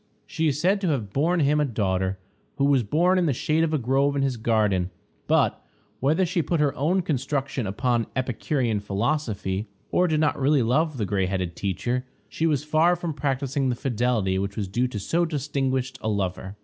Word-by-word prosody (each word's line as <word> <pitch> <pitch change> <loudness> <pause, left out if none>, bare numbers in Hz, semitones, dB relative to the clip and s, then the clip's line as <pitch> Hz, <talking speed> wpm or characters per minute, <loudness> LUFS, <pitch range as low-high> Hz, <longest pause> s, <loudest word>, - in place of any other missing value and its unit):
She 160 -2 -1
is 145 -1 0
said 195 +5 +2
to 190 - 0
have 115 -11 -1
borne 165 +5 +2
him 150 +1 +3
a - - +3
daughter, 95 -6 -1 0.4
who 140 - +1
was 140 -2 +4
born 175 - +2
in 175 - +2
the 145 - +2
shade 155 +6 +1
of 165 - +1
a 155 - +2
grove 135 +3 +1
in 140 - +1
his 135 -2 0
garden; 105 -5 +1 0.4
but, - - +2 0.4
whether 155 +8 +2
she 175 0 0
put 165 +1 -1
her 145 -2 +2
own 175 +7 +1
construction 135 -4 -2
upon 120 +4 +1
the - - -5
Epicurean 125 -2 -1
philosophy, 105 -1 -2 0.2
or 180 - +3
did 155 -2 +1
not 155 -2 +1
really 140 -1 +3
love 150 +5 +1
the 110 - -1
gray 95 -1 0
headed 90 -2 -2
teacher, 120 +6 -2 0.2
she 165 - -1
was 145 -3 +1
far 160 +3 +3
from 170 -2 -4
practicing 140 -1 -1
the 125 - 0
fidelity 120 -6 0
which 100 +1 -3
was 100 -3 -2
due 120 +7 0
to 125 - -6
so 165 - 0
distinguished 135 -4 -2
a 110 - -1
lover. 95 -1 -2
135 Hz, 200 wpm, -25 LUFS, 110-155 Hz, 0.4 s, was